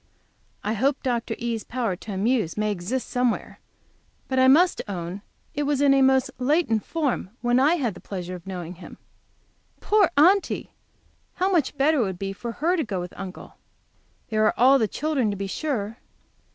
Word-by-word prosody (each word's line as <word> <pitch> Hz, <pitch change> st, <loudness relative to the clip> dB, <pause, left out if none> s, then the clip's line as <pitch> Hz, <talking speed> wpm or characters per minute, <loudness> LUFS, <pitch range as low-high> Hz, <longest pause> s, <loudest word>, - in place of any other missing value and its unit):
I 210 Hz, -, -1 dB
hope 270 Hz, +6 st, 0 dB
Dr. 240 Hz, -3 st, -1 dB
E.'s 230 Hz, -2 st, -3 dB
power 235 Hz, -6 st, -2 dB
to 205 Hz, +4 st, -9 dB
amuse 210 Hz, -2 st, 0 dB
may 215 Hz, 0 st, +1 dB
exist 205 Hz, +7 st, -3 dB
somewhere, 250 Hz, -1 st, -1 dB, 0.7 s
but 260 Hz, 0 st, +4 dB
must 345 Hz, +6 st, +5 dB
own 180 Hz, 0 st, -5 dB, 0.3 s
it 290 Hz, -, -2 dB
was 290 Hz, -1 st, 0 dB
in 280 Hz, -1 st, +5 dB
a 275 Hz, -, +4 dB
most 265 Hz, 0 st, +3 dB
latent 255 Hz, -5 st, +1 dB
form 295 Hz, -, -2 dB
when 240 Hz, +1 st, +3 dB
I 295 Hz, +6 st, +4 dB
had 250 Hz, -, -1 dB
the -, -, -12 dB
pleasure 185 Hz, -2 st, -6 dB
of 180 Hz, 0 st, -9 dB
knowing 180 Hz, -2 st, -5 dB
him. -, -, -11 dB, 0.8 s
Poor 415 Hz, -4 st, +3 dB
Aunty! 370 Hz, +7 st, +3 dB, 0.6 s
How 375 Hz, +2 st, +1 dB
much 300 Hz, -6 st, +1 dB
better 295 Hz, +2 st, +3 dB
it -, -, +3 dB
would 190 Hz, -2 st, -4 dB
be 195 Hz, +1 st, -4 dB
for 235 Hz, +3 st, -6 dB
her 340 Hz, +8 st, +1 dB
to 325 Hz, -, 0 dB
go 200 Hz, -6 st, -3 dB
with 180 Hz, 0 st, -6 dB
Uncle! 190 Hz, -2 st, -9 dB, 0.7 s
There 215 Hz, -1 st, +1 dB
are 265 Hz, +3 st, +6 dB
the 220 Hz, -, +2 dB
children, 275 Hz, -1 st, -1 dB
to 200 Hz, -, -3 dB
be 200 Hz, -, -3 dB
sure. 225 Hz, -1 st, -3 dB
245 Hz, 180 wpm, -24 LUFS, 200-285 Hz, 0.8 s, are